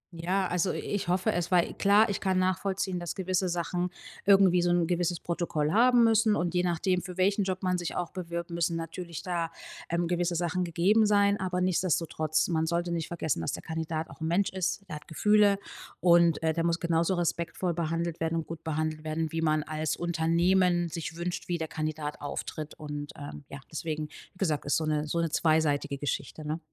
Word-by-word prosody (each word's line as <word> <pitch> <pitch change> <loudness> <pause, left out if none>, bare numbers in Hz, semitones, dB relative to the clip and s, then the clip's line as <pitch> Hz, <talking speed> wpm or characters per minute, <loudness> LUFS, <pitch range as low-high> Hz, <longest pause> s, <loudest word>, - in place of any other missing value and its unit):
Ja, 185 +4 0
also 180 +1 0
i - - -3
ich 205 -3 -3
hoffe 180 +1 +2
es, 175 -1 -1
weil 175 -2 +3
klar, 205 +2 +4
ich 200 - -2
kann 190 -1 +1
nachvollziehen, 185 0 0
dass 175 -2 -4
gewisse 185 -1 0
Sachen 175 +1 -1 0.4
irgendwie 195 -3 +6
so 175 - +1
'n 175 -1 +3
gewisses 175 0 0
Protokoll 165 -3 -1
haben 245 +1 +5
müssen 220 -1 +4
und 175 0 -1
je 180 - +2
nachdem, 180 +1 +1
für 180 0 -8
welchen 200 +2 +2
Job 185 0 -3
man 180 -1 +1
sich 175 - -4
auch 175 -1 -2
bewirbt, 170 -1 -5
müssen 170 0 0
natürlich 165 0 -6
da, 170 -2 -2 0.4
ähm, 170 0 0
gewisse 175 0 0
Sachen 175 +2 0
gegeben 190 +6 +3
sein. 205 0 +3
Aber 180 -1 -1
nichtsdestotrotz, 165 -3 +1
man 160 -1 +1
sollte 175 +1 -1
nicht 165 -2 -2
vergessen, 160 - -2
dass 80 - -2
der - - -5
Kandidat 160 0 -3
auch - - -14
'n 160 - -1
Mensch 185 +4 +1
ist. 190 +1 -2
Der 150 -3 -5
hat 150 - -14
Gefühle 205 +4 +4 0.4
und, 170 -2 +4
äh, 160 0 +2
der 165 +1 -1
muss 170 0 +1
genauso 170 +1 +1
respektvoll 170 +1 -1
behandelt 165 0 -2
werden 165 0 -1
und 165 - -2
gut 165 -1 -8
behandelt 155 0 -2
werden, 155 0 -2
wie 165 0 -2
man 155 -1 +2
als 155 +1 -2
Unternehmen 175 +1 +2
sich 160 -1 -5
wünscht, 175 +1 -4
wie 175 - 0
der 160 -1 -3
Kandidat 155 -1 -4
auftritt. 150 +1 -5
Und, 145 -1 -6
ähm, 145 0 -8
ja, 140 0 -8
deswegen, 155 -1 -3 0.2
wie - - -23
gesagt, 160 -7 0
ist 145 - +2
so 160 - -1
'ne 150 0 0
so 170 - -2
'ne 165 -2 0
zweiseitige 150 -3 +2
Geschichte, 145 +2 -4
ne? 155 +2 -2
170 Hz, 205 wpm, -29 LUFS, 160-185 Hz, 0.4 s, irgendwie